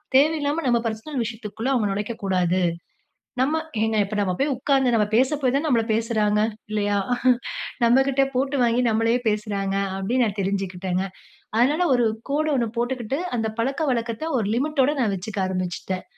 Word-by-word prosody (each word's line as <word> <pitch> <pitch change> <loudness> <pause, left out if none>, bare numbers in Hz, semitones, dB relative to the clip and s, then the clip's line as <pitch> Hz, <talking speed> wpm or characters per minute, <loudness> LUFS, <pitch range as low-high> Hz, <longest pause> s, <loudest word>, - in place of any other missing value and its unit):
தேவையில்லாம 300 +2 +3
நம்ம 240 -2 +3
பர்சனல் 235 +5 -3
விஷயத்துக்குள்ள 225 +1 -4
அவங்க 230 -5 +1
நொலைக்ககூடாது. 190 -4 0 0.8
நம்ம 290 +5 +2 0.3
ஏங்க 220 0 +1
இப்ப 200 - -6
நம்ம 190 -2 +1
போய் 280 +1 +1
உட்கார்ந்து 265 -2 +2
நம்ம 210 -2 +3
பேச 260 +2 +4
போய் 255 - +2
தான, 280 - +1
நம்மள 235 -4 +3
பேசுறாங்க 215 -2 +1 0.3
இல்லயா? 205 -1 0 0.9
நம்மகிட்ட 270 +3 +4
போட்டு 270 +2 0
வாங்கி 240 +1 +3
நம்மளயே 225 +2 +2
பேசுறாங்க 205 -2 -1 0.2
அப்பிடின்னு 240 +6 +1
நான் 205 -1 -4
தெரிஞ்சுக்கிட்டேங்க. 190 -1 -2 0.5
அதனால 300 +9 +3
ஒரு 240 -2 +3 0.2
கோடு 305 +2 +1
ஒன்னு 235 -2 0
போட்டுக்கிட்டு, 245 +3 -2 0.2
அந்த 225 -1 -1
பழக்கவழக்கத்த 255 -1 -1
ஒரு 215 - -1
லிமிட்டோட 290 +1 +2
நான் 215 -5 +1
வச்சுக்க 195 +2 -5
ஆரம்பிச்சுட்டேன். 185 0 -3
230 Hz, 145 wpm, -23 LUFS, 205-265 Hz, 0.9 s, பேச